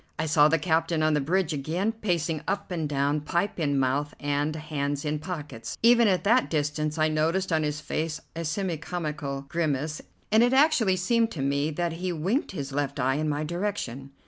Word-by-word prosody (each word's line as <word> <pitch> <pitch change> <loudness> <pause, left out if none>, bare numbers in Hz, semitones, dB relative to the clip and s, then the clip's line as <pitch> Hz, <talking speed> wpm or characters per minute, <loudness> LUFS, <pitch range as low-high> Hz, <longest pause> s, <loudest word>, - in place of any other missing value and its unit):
I 160 - -1
saw 150 -1 +5
the 165 +2 +3
captain 160 0 +1
on 155 0 +3
the 150 - +2
bridge 170 +3 +1
again, 165 +9 -1
pacing 170 -8 -1
up 200 0 -2
and 160 -4 -2
down, 145 +1 +1
pipe 175 +6 -1
in 145 -3 +1
mouth 135 +3 0
and, 145 +1 -1
hands 145 -2 -3
in 150 0 -1
pockets. 150 -9 -6
Even 235 0 +6
at 185 -3 +2
that 240 +5 +3
distance 150 0 -1
I 155 0 +3
noticed 165 +4 0
on 160 - +3
his 150 0 -2
face 155 +1 -2 0.2
a 165 - -3
semi 170 +1 -2
comical 150 -4 -4
grimace, 155 -1 -1 0.3
and 220 +1 +6
it 245 +2 +4
actually 265 -9 +4
seemed 225 +5 +2
to 140 - -3
me 140 +2 +1
that 170 +2 -2
he 180 +2 -3
winked 185 - -1
his 140 -7 -5
left 140 0 -2
eye 135 +2 +1
in 155 0 0
my 150 +1 -1
direction. 155 - -3
155 Hz, 200 wpm, -27 LUFS, 145-180 Hz, 0.3 s, Even